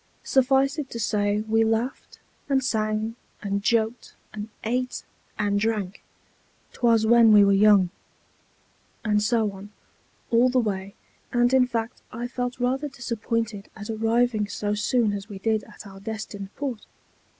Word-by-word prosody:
Suffice 270 +2 +2
it 280 -3 -4
to 230 - -6
say, 205 -1 +1
we 220 +1 +2
laughed, 225 +4 -2 0.3
and 270 -1 +2
sang, 215 -1 -1 0.3
and 200 0 -1
joked, 225 +1 0 0.2
and 215 0 -6
ate, 250 +3 -2 0.3
and 205 -1 +1
drank 210 -3 -2 0.7
('t - - -16
was 230 -2 +4
when 230 0 +6
we 205 -1 +8
were 200 - +4
young), 200 -3 +5 1.1
and 210 -1 +2
so 220 -1 +1
on, 195 +1 -11 0.6
all 240 +2 +5
the 255 - 0
way, 200 -4 -1 0.4
and 240 +1 +2
in 255 -1 +5
fact 230 -1 -3
I 235 +2 -4
felt 245 0 -4
rather 265 +4 0
disappointed 230 -4 -3
at 210 +1 -6
arriving 225 0 +1
so 205 0 -2
soon 210 +1 +1
as 200 +1 -6
we 200 - -7
did 220 +2 0
at 210 0 -13
our 195 -1 -11
destined 205 -1 -6
port. 265 -6 -5
220 Hz, 150 wpm, -25 LUFS, 210-240 Hz, 1.1 s, we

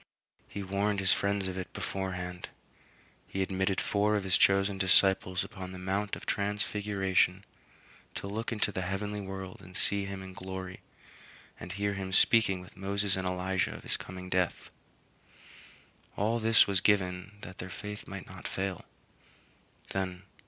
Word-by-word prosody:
He 100 - -5
warned 100 +1 0
his 95 -4 +7
friends 100 +3 0
of 95 0 -3
it 90 - -6
beforehand. 90 -2 -4 0.8
He 95 - -1
admitted 95 +1 0
four 105 +1 +2
of 100 - 0
his 95 -2 +3
chosen 100 0 +4
disciples 95 -1 +4
upon 95 -1 -7
the - - -7
Mount 95 +3 -1
of - - -10
Transfiguration 100 -2 +1 0.7
to - - -4
look 110 +4 -3
into 105 -2 +1
the 95 - -2
heavenly 100 +3 -2
world 95 -1 -6
and 90 +2 -9
see 100 -2 +1
him 95 -1 -5
in 95 0 -9
glory 95 0 -6 0.8
and 90 +1 -6
hear 100 +1 0
him 95 -1 -4
speaking 100 -3 +5
with 90 - -14
Moses 100 +1 0
and 95 -1 -2
Elijah 90 0 0
of - - -10
his - - 0
coming 90 0 -7
death. 90 -1 0 1.5
All 110 +3 +2
this 115 0 +6
was 95 -2 +2
given 95 -1 +2
that 90 +2 -9
their 95 - -5
faith 105 +2 -7
might 100 -1 -6
not 95 -1 -8
fail. 95 -2 -3
95 Hz, 150 wpm, -31 LUFS, 95-100 Hz, 1.5 s, his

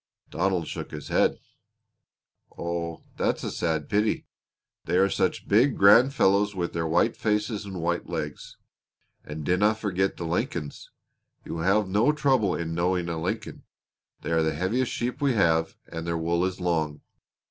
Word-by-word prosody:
Donald 90 -1 0
shook - - -6
his 75 -1 -8
head. - - +2 1.2
"Oh, 85 -1 -4
that's - - 0
a - - -3
sad 80 -4 -1
pity. 105 +1 0 0.6
They 85 +2 +1
are 95 +1 +3
such - - -1
big, 120 +6 +3
grand 115 +7 +7
fellows 100 -5 +2
with 85 -2 -2
their 85 -1 -1
white 85 +8 +2
faces 105 0 -1
and 95 -3 -6
white 85 0 -1
legs. - - -5 0.7
And 75 0 -7
dinna 105 +6 +3
forget 95 -3 -1
the 85 - -4
Lincolns. 80 -2 -3 0.6
You - - -6
will 80 -1 -3 0.2
have - - -10
no 105 +9 +3
trouble 130 -10 +2
in 80 -1 -3
knowing 90 +1 0
a 80 -1 -3
Lincoln. - - -4 0.6
They - - -4
are 80 0 +3
the 80 -1 0
heaviest 110 +10 0
sheep 125 +4 -3
we 140 -2 +3
have, 80 -6 +2
and 80 0 -6
their 85 0 0
wool 85 +2 0
is 95 0 -3
long. 80 -4 -1
90 Hz, 165 wpm, -26 LUFS, 85-105 Hz, 1.2 s, grand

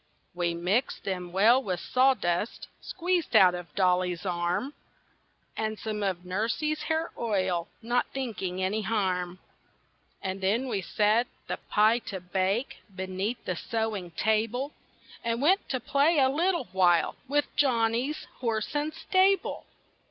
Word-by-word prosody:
We 175 -1 -1
mixed 190 +10 0
them 180 -2 -4
well 220 +8 +5
with 185 -8 -2
sawdust 245 -7 +1
Squeezed 350 -7 -1
out 185 -4 +7
of 175 -1 -8
Dolly's 180 -1 +1
arm, 180 +9 -1 0.8
And 215 0 -2
some 215 -1 -4
of 185 -3 -2
Nursie's 230 +11 -1
hair 320 +1 -1
oil, 185 -6 0 0.2
Not 240 +2 +1
thinking 195 -8 -3
any 205 +4 0
harm. 185 -4 -1 0.8
And 190 0 -4
then 220 +8 +1
we 210 -6 -1
set 215 +6 +2 0.2
the - - -3
pie 215 +3 +4
to 190 - -4
bake, 190 +7 -1 0.2
Beneath 190 +5 -3
the 185 - -1
sewing 220 -2 -3
table; 225 +6 0 0.5
And 230 0 -1
went 365 +9 +2
to 260 - -1
play 285 +7 +2
a 265 -2 +5
little 340 +5 +1
while 175 -3 +3
With 290 +2 0
Johnny's 245 +1 +1
horse 225 -2 -1
and 295 +1 0
stable. 380 +3 +1
215 Hz, 135 wpm, -28 LUFS, 185-260 Hz, 0.8 s, out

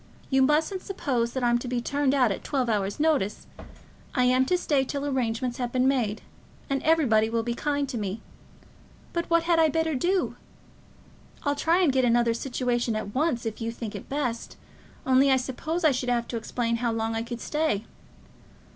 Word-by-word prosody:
You 265 0 +4
mustn't 310 +7 +2
suppose 255 -11 -2
that 260 - -2
I'm 240 0 +3
to 250 - -6
be 245 0 -1
turned 280 +2 0
out 250 -5 +3
at - - -4
twelve 260 -4 -1
hours' 200 0 -1
notice. 295 -10 +1 0.7
I 250 - +3
am 255 +1 +3
to 360 - +2
stay 290 -6 +1
till 280 +1 -4
arrangements 250 -2 -1
have 245 -1 -2
been 255 +1 +2
made, 235 -6 0 0.5
and 275 - +1
everybody 250 -9 +3
will 230 0 0
be 235 +1 -2
kind 285 +2 -1
to 250 -4 -4
me. 205 +1 -3 0.9
But 340 0 -2
what 335 0 +3
had 335 -1 +2
I 320 -1 +5
better 320 +1 0
do? 355 +8 0 1.1
I'll 285 -2 +1
try 330 +5 +2
and 290 -7 +3
get 260 -1 +2
another 235 -1 +3
situation 240 -1 -1
at 205 -1 -4
once 265 -4 0
if 225 +1 -4
you 230 0 -2
think 230 -2 -6
it - - -8
best, 255 -5 -3 0.5
only 265 +1 +4
I 265 - +5
suppose 305 +7 -3
I 310 - +6
should 250 -1 -2
have 235 -1 0
to 235 - -2
explain 230 +1 -1
how 235 0 0
long 225 0 -1
I 225 - -1
could 235 +1 -6
stay. 300 -9 -1
255 Hz, 195 wpm, -26 LUFS, 235-290 Hz, 1.1 s, I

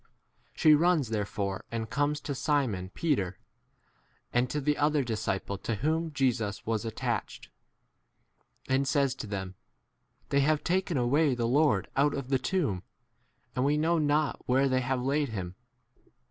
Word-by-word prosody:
She 155 - +6
runs 155 -4 +3
therefore 100 -2 -2
and 115 -1 -3
comes 145 +5 0
to 145 - -3
Simon 130 -10 0
Peter, 100 - -1 1.0
and 125 +1 +2
to 150 - -1
the 150 +1 +1
other 150 -1 +2
disciple 105 -4 -2
to 115 +3 -2
whom 160 +8 -1
Jesus 120 -7 -1
was 110 0 -1
attached, 110 - -3 1.2
and 135 +1 +1
says 140 -1 +2
to 130 - -7
them, 95 -2 -4 0.8
They 140 - +3
have 150 +1 +2
taken 180 -3 0
away 135 +3 +2
the 120 -1 0
Lord 135 -6 +3
out 145 +1 +3
of 135 -2 -5
the 135 -1 +2
tomb, 140 - -1 0.7
and 125 - +1
we 145 +2 +2
know 165 +2 +2
not 150 0 +1
where 135 +2 +3
they 130 -1 +1
have 130 +1 0
3 - - -4
laid 140 +1 +1
him. 95 -5 -5
135 Hz, 155 wpm, -29 LUFS, 110-150 Hz, 1.2 s, She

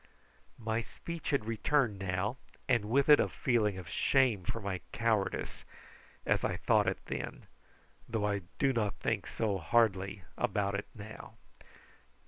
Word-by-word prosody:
My 110 0 -1
speech 170 +7 -6
had 140 -7 +1
returned 115 -1 +1
now, 95 +5 -1 0.3
and 120 -5 +3
with 140 +4 +3
it 150 -1 +8
a - - +2
feeling 110 -6 +1
of 90 -3 -8
shame 120 +2 +2
for 115 - -2
my 95 -4 -3
cowardice, 110 -4 0 0.6
as - - +2
I - - 0
thought - - +3
it - - +1
then, - - -5 0.7
though 110 -2 0
I 100 -1 0 0.2
do 135 -1 +3
not 105 -4 0
think 110 -4 -1
so 105 -4 -1
hardly 95 +1 +2 0.2
about 100 -4 +1
it 100 +1 -3
now. 110 +1 -10
110 Hz, 145 wpm, -32 LUFS, 100-120 Hz, 0.7 s, it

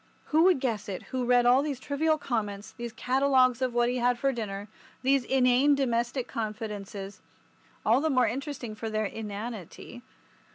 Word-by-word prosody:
Who 320 +3 +6
would 370 -6 +5
guess 230 -6 -2
it 185 - -5
who 255 -1 0
read 245 0 +4
all 250 +2 +6
these 285 -3 -3
trivial 310 +3 +1
comments, 210 -7 -3
these 235 -1 -7
catalogues 255 +1 +2
of 255 -1 +1
what 240 0 +3
he 250 +1 0
had 245 0 +2
for 275 +2 +1
dinner, 205 -4 -5 0.4
these 270 0 +3
inane 260 +2 +4
domestic 240 -1 -1
confidences—all 210 +2 -4
the 315 - +1
more 255 -3 +3
interesting 260 -1 -4
for 220 +1 -5
their 215 0 -1
inanity! 215 +1 -7
245 Hz, 160 wpm, -28 LUFS, 220-265 Hz, 0.4 s, Who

